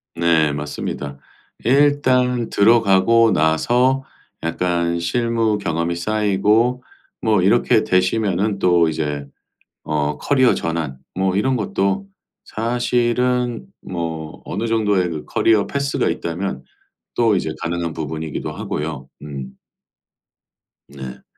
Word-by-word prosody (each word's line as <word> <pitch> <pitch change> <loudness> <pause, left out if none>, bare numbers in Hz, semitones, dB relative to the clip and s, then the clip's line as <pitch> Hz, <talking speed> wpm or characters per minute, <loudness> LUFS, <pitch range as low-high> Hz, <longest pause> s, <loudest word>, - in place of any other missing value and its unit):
네. 80 -3 +2
맞습니다 75 -1 -5 0.5
일단 125 -2 +3
들어가고 115 +1 +4
나서 120 - +2 0.4
약간 85 0 0
실무 115 +3 0
경험이 85 -3 -2
쌓이고 105 +6 +1 0.4
뭐 110 -4 +2
이렇게 110 +3 +3
되시면은 95 +1 +1
또 85 -3 +4
이제 75 -2 -3 0.6
어 75 -1 -1
커리어 130 -3 +3
전환 80 -5 -3 0.2
뭐 95 0 0
이런 130 +5 +1
것도 100 - -1 0.4
사실은 120 - 0
뭐 80 -3 -5
어느 105 +5 -3
정도의 105 -5 +1
그 75 -2 -5
커리어 110 -3 +2
패스가 140 0 -1
있다면 85 -5 -3 0.5
또 115 -4 +3
이제 80 - -1
가능한 85 -1 -2
부분이기도 80 0 -4
하고요. 75 -3 -5
음. 70 -3 -6 1.4
네. 65 -2 -9
95 Hz, 225 characters per minute, -20 LUFS, 80-115 Hz, 1.4 s, 들어가고